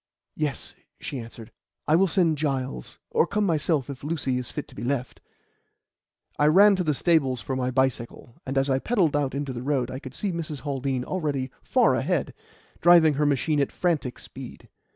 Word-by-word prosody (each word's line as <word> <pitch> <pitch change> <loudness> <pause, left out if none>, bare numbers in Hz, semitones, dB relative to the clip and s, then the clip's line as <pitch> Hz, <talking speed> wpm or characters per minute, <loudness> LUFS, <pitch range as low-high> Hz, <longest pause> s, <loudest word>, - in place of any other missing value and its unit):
"Yes," 150 -3 -3 0.3
she 135 - -5
answered. 115 0 -10 0.4
"I 155 - +4
will 190 +3 +4
send 165 -5 +2
Giles, 130 - -3
or - - +3
come 210 +2 0
myself 155 -5 +1
if 140 -1 -8
Lucy 140 -5 -1
is 125 - -6
fit 150 - -6
to - - -16
be - - -8
left." 125 0 -3 1.2
I 150 - +4
ran 200 +6 +7
to 180 - 0
the 155 -3 0
stables 140 -6 +2
for 130 +4 -4
my 130 -1 -1
bicycle, 125 -2 -2
and 135 +1 -4
as 135 +1 +2
I 135 -1 +1
pedalled 180 - +1
out 140 -2 0
into 140 -1 -3
the 120 - -5
road 130 -2 -1
I 130 - -5
could 130 -1 -10
see 200 - -2
Mrs. 160 -4 -5
Haldean 135 -3 -2
already 145 -8 -2
far - - +3
ahead, - - -1 0.5
driving 170 -3 +6
her 150 +1 +1
machine 145 +2 +1
at 140 - 0
frantic 155 -8 -1
speed. - - -11
140 Hz, 190 wpm, -25 LUFS, 130-160 Hz, 1.2 s, ran